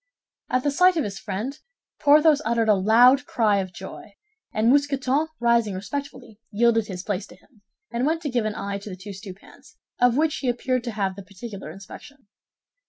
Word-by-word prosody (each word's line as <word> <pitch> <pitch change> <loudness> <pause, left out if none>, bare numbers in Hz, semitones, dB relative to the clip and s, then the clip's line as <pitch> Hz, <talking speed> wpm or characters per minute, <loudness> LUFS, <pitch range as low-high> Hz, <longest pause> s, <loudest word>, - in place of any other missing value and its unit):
At 255 0 +1
the 290 - +1
sight 360 +4 +4
of 310 - +1
his 195 -2 -5
friend, 220 +9 -5 0.4
Porthos 300 0 +5
uttered 230 -1 +1
a - - +7
loud 240 +8 +5
cry 210 -4 +2
of 185 -1 -4
joy; 190 +2 -10 0.4
and 220 +3 +2
Mousqueton, 280 +1 +1
rising 235 -4 +2
respectfully, 245 +1 -7
yielded 225 0 +2
his 185 -3 -6
place 200 -1 -3
to - - -15
him, 230 -7 -27 0.3
and 235 +1 -2
went 325 +1 -1
to 295 - -2
give 240 -3 0
an 215 0 -2
eye 200 0 -4
to 200 - -9
the 185 - -6
two 195 +3 -9
stewpans, 195 -1 -13 0.2
of 245 0 +4
which 310 0 +1
he 260 - -1
appeared 250 +1 -1
to 240 - -3
have 195 -3 -1
the 200 - -8
particular 200 -1 -9
inspection. 200 - -12
235 Hz, 190 wpm, -24 LUFS, 200-275 Hz, 0.4 s, a